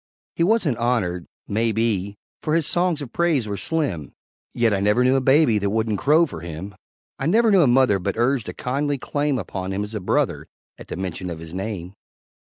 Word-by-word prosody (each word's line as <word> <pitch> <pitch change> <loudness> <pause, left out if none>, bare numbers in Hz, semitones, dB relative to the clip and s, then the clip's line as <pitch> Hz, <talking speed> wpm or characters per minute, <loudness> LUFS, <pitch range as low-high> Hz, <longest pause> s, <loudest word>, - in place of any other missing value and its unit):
He - - +1
wasn't 175 - +2
honored, 95 -8 0 0.2
may 115 +2 +1
be 105 -3 -1 0.2
For 155 - 0
his 165 -2 +2
songs 175 -3 0
of 120 - -10
praise 160 -9 +1
were 100 - -3
slim, 115 - -2 0.4
Yet 115 -3 +2
I 100 - +1
never 105 +5 +3
knew 130 +1 +4
a 135 - +2
baby 135 -4 +4
That 100 0 -1
wouldn't 110 -1 0
crow 155 +4 +4
for 130 - -8
him; 85 +4 -7 0.5
I 135 - -1
never 225 +5 +4
knew 195 -3 +6
a 145 - +5
mother 120 -5 +4
But 100 +3 -3
urged 120 0 +1
a - - -5
kindly 140 +3 -1
claim 145 +1 -1
Upon 95 -4 -4
him 100 +2 -2
as 105 +2 -7
a 105 - -2
brother, 90 - 0 0.3
At - - -11
the - - -5
mention 90 0 -4
of 85 - -5
his 80 0 -10
name. 95 -2 -5
115 Hz, 210 wpm, -22 LUFS, 100-145 Hz, 0.5 s, knew